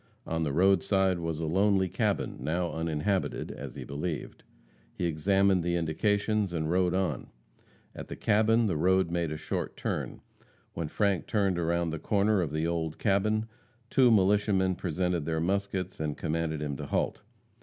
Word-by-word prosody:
On 80 0 -2
the 75 -3 0
roadside 95 +2 +3
was 85 -2 -3
a 80 - -2
lonely 95 +3 +2
cabin, - - -1
now 85 +6 -1
uninhabited, 80 +4 -1
as - - -8
he - - -6
believed. 75 +3 -5 0.5
He 90 - -2
examined 95 +4 +2
the 85 +1 0
indications, 100 +4 0
and 80 -1 -1
rode 90 0 +2
on. 90 -9 -1 0.7
At - - -8
the - - -6
cabin 110 +2 +3
the 90 -7 0
road 95 +1 +2
made 85 -2 -1
a 75 - -3
short 75 - -4
turn. - - -3 0.5
When 80 -2 -3
Frank 100 +2 0
turned 100 -4 +1
around 85 0 0
the 80 - -4
corner 100 +2 +2
of 80 - -2
the 80 +1 -1
old 80 -2 -2
cabin, 105 +2 +1 0.5
two 130 -3 +5
militiamen 100 -2 +3
presented 90 -2 -1
their 80 -1 0
muskets 95 +1 -2
and 75 -2 -2
commanded 80 -1 -2
him 70 -2 -3
to - - -6
halt. - - -1
90 Hz, 165 wpm, -29 LUFS, 80-100 Hz, 0.7 s, two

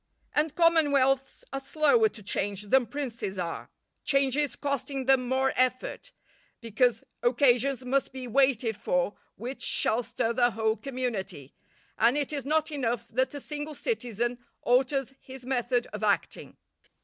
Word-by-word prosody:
And 305 0 +1
commonwealths 280 -6 +3
are 270 - -1
slower 320 +11 +3
to 215 - -14
change 200 0 -2
than 245 +4 +3
princes 235 -9 -4
are, 170 -2 -4 0.3
changes 275 0 +1
costing 275 -1 -3
them 260 -1 +3
more 265 +1 +1
effort; 255 - -1 0.5
because 230 0 +1 0.2
occasions 255 +1 +3
must 270 +2 0
be 260 -1 -6
waited 245 -3 +2
for 180 -1 0 0.2
which 250 +5 -6
shall 225 +3 +2
stir 230 -1 -1
the 240 0 +3
whole 220 -1 0
community, 215 - -4 0.5
and 235 +5 +4
it 290 0 -2
is 280 -3 -3
not 310 +2 +1
enough 235 -5 -2
that 260 +4 0
a - - -4
single 300 +1 -5
citizen 240 - -2 0.2
alters 265 +1 +2
his 260 -1 -11
method 245 -1 0
of 210 0 -5
acting. 205 -1 -1
255 Hz, 140 wpm, -28 LUFS, 235-275 Hz, 0.5 s, and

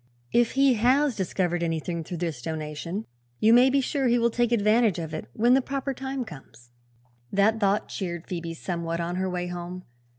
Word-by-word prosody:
"If 240 -1 +3
he 275 -1 +4
has 260 +3 +3
discovered 180 -2 -1
anything, 165 0 -2
through 175 +2 -6
this 165 -7 -3
donation, 160 - -4 0.3
you 220 +1 +5
may 250 +2 +7
be 275 +1 +3
sure 270 0 0
he 240 0 +3
will 235 0 +2
take 240 0 +1
advantage 215 -2 +3
of 160 -2 -5
it 155 - -5
when 240 +3 +3
the 265 - +5
proper 275 +1 -3
time 265 0 -4
comes." 135 - -13 0.6
That 210 +3 +3
thought 200 0 +1
cheered 175 -3 -4
Phoebe 170 -2 -5
somewhat 170 -1 -3
on 170 +1 -2
her 190 0 -1
way 180 -1 -2
home. 175 +1 -6
190 Hz, 190 wpm, -26 LUFS, 170-240 Hz, 0.6 s, may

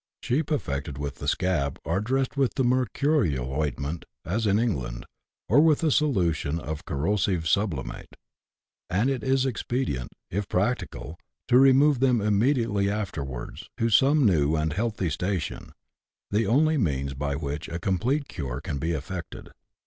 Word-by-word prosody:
Sheep 145 +4 0
affected 70 - -2
with 70 -1 -4
the 70 - -6
scab 75 -5 0
are 85 +6 0
dressed 130 +5 -1
with 135 -3 +1
the 135 - +1
mercurial 125 - +1
ointment, 75 +2 -2 0.2
as 110 +6 0
in 100 0 +3
England, 65 - -2 0.4
or 125 +9 +5
with 160 0 +4
a 155 - +3
solution 85 - +1
of 80 -2 -6
corrosive 85 +2 0
sublimate; 90 - -1 0.7
and 105 +9 +2
it 130 -5 -3
is 135 +1 +2
expedient, 120 - -2 0.2
if 100 +2 -2
practicable, 95 - -2 0.3
to 125 - +6
remove 135 +1 +5
them 125 -2 +3
immediately 105 -1 +2
afterwards 75 - -5
to 115 0 +1
some 140 +5 +5
new 80 -6 +3
and 75 0 0
healthy 105 -3 -1
station, 90 +2 -3 0.6
the 105 +2 +1
only 155 +7 +3
means 70 - -1
by 70 +1 -2
which 75 +2 -4
a 85 - -3
complete 115 - 0
cure 65 -1 -5
can 70 -1 -4
be 80 +4 -1
effected. 85 +4 -6
95 Hz, 150 wpm, -26 LUFS, -, 0.7 s, to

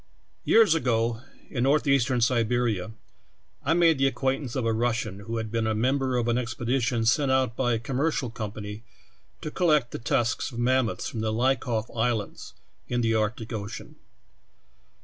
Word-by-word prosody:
Years 220 -6 +6
ago, 115 -6 0 0.3
in 120 - -2
northeastern 135 -2 +2
Siberia, 115 -4 +1 0.7
I 160 +4 +2
made 165 -4 +4
the 135 - +4
acquaintance 135 -1 -2
of 130 -3 -1
a 115 - +1
Russian 110 -3 -1
who 115 +3 -5
had 110 -1 -4
been 115 -1 0
a 110 - 0
mem 130 +6 +1
ber 130 -2 0
of 120 -1 0
an 120 +1 +2
expedition 120 0 -1
sent 135 +4 +3
out 130 -3 +1
by 120 -1 +1
a - - +1
commercial 130 +1 -1
company 105 -1 -6 0.6
to 155 - -5
collect 150 -9 +2
the - - -5
tusks 115 +2 0
of 115 - -9
mammoths 125 -1 +1
from 115 - -5
the 110 0 -1
Liakhov 120 -1 0
Islands, 115 -2 -2 0.3
in 120 0 -1
the 115 -1 +1
Arctic 110 +2 -1
ocean. 105 0 -6
120 Hz, 165 wpm, -26 LUFS, 115-130 Hz, 0.7 s, Years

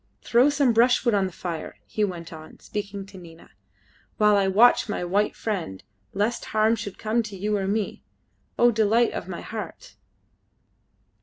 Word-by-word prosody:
"Throw 245 +4 +4
some 280 -4 +2
brushwood 235 +1 +3
on 195 -2 +2
the - - -8
fire," 170 -2 -6
he 215 - -2
went 175 -4 -4
on, 155 0 -12
speaking 200 -1 -6
to 195 -1 -13
Nina, 165 -2 -15 0.7
"while 210 -2 +4
I 200 -1 +2
watch 220 +4 +4
my 205 - -2
white 200 +4 0
friend, 165 - -4 0.3
lest 215 +4 -1
harm 220 +1 +2
should 200 -3 -7
come 220 +2 0
to 210 -3 -8
you 210 +3 -1
or 200 - -1
to - - 0
me, 210 -1 -2 0.6
O 240 0 +5
delight 225 +2 +2
of - - -5
my - - -6
heart!" - - -8
210 Hz, 170 wpm, -25 LUFS, 190-230 Hz, 0.7 s, O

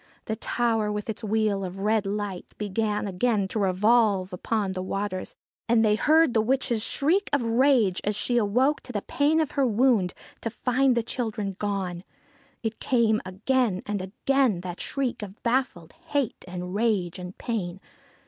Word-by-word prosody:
The 220 - -2
tower, 225 -2 0
with 210 +1 -3
its 220 - -9
wheel 215 -2 +1
of 185 0 -5
red 210 0 +1
light, 200 -2 -4
began 210 +1 -1
again 200 +1 +1
to 220 - -2
revolve 200 0 +3
upon 200 +2 -1
the 185 0 -3
waters, 190 0 -3 0.3
and 225 -1 +4
they 210 - +4
heard 310 +4 +4
the 220 - +4
witch's 240 -1 0
shriek 345 - +1
of 285 -3 +2
rage 230 -4 +3
as 210 0 0
she 240 +4 0
awoke 245 +7 +2
to 250 - -9
the 205 -4 -3
pain 295 +3 +2
of 310 -4 0
her 275 -2 +2
wound, 225 -5 +2 0.3
to 230 - -2
find 250 +2 +1
the 235 - +2
children 215 -5 -3
gone. 190 -4 -2 0.6
It 225 -1 -3
came 230 -4 +2
again 210 +1 0
and 205 -2 -2
again, 220 +1 +1
that 180 -1 -6
shriek 265 -5 -2
of 205 0 -9
baffled 235 -9 -1
hate 290 -7 -3
and 180 0 -5
rage 200 -5 0
and 180 +1 -8
pain. 190 -6 -3
215 Hz, 165 wpm, -26 LUFS, 195-245 Hz, 0.6 s, and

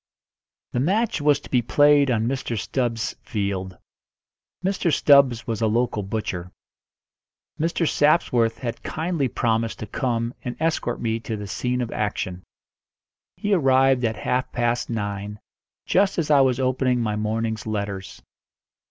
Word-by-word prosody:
The 125 - -1
match 195 - +1
was 145 -1 +3
to - - -13
be 125 - +3
played 145 +3 +4
on 115 -2 +1
Mr. 130 -3 -2
Stubbs's 120 0 -2
field. 100 -4 -3 0.9
Mr. 190 -3 +1
Stubbs 135 -6 +5
was 115 -3 -3
a 110 - +3
local 115 -1 0
butcher. 95 -3 -4 1.1
Mr. 165 +1 0
Sapsworth 125 -8 +2
had 120 -2 -5
kindly 160 -3 -1
promised 115 -1 0
to - - -6
come 115 +1 -2
and 125 -2 -5
escort 160 -7 -1
me 115 -1 -1
to 110 -1 -5
the 105 - -6
scene 125 +5 -2
of 120 - -3
action. 95 -3 -3 1.0
He 205 0 0
arrived 135 -5 +4
at 110 -1 0
half 130 +4 -1
past 120 0 0
nine, 105 -2 -4 0.5
just 195 +1 +2
as 155 -3 0
I 140 -2 +6
was 130 -1 +2
opening 130 -1 +1
my 110 -3 -1
morning's 110 +1 -2
letters. 100 -3 -4
120 Hz, 145 wpm, -23 LUFS, 110-135 Hz, 1.1 s, I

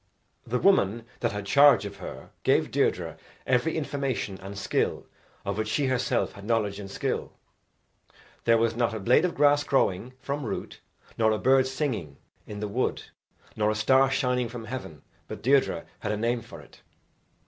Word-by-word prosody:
The 120 +2 0
woman 115 - +3
that 120 - 0
had 105 -1 -5
charge 140 -2 +6
of 100 0 -7
her - - -9
gave - - +2
Deirdre - - 0 0.3
every 130 +6 +1
information 135 -9 -2
and 100 +1 -8
skill 100 - -1 0.4
of 100 +1 -2
which 110 - -1
she 140 +6 0
herself 130 -1 0
had 100 - -12
knowledge 105 -2 0
and 100 -1 -7
skill. - - -3 1.1
There 115 0 +5
was 115 0 +1
not 120 -1 0
a - - -3
blade 120 - +4
of 180 - -2
grass 145 0 +4
growing 125 -3 0
from 140 +1 -3
root, 115 - -5 0.4
nor 110 -1 +4
a 110 - +1
bird 130 +2 +4
singing 130 - -3 0.3
in 105 -1 -7
the 105 - -2
wood, 120 +6 -1 0.5
nor 105 0 +1
a 110 - 0
star 130 +5 +4
shining 125 -3 0
from 115 -1 -7
heaven 95 - -7 0.2
but - - -8
Deirdre 135 +2 +2
had - - -3
a 105 - -1
name 120 +2 0
for 115 - -11
it. - - -19
115 Hz, 175 wpm, -27 LUFS, 105-130 Hz, 1.1 s, charge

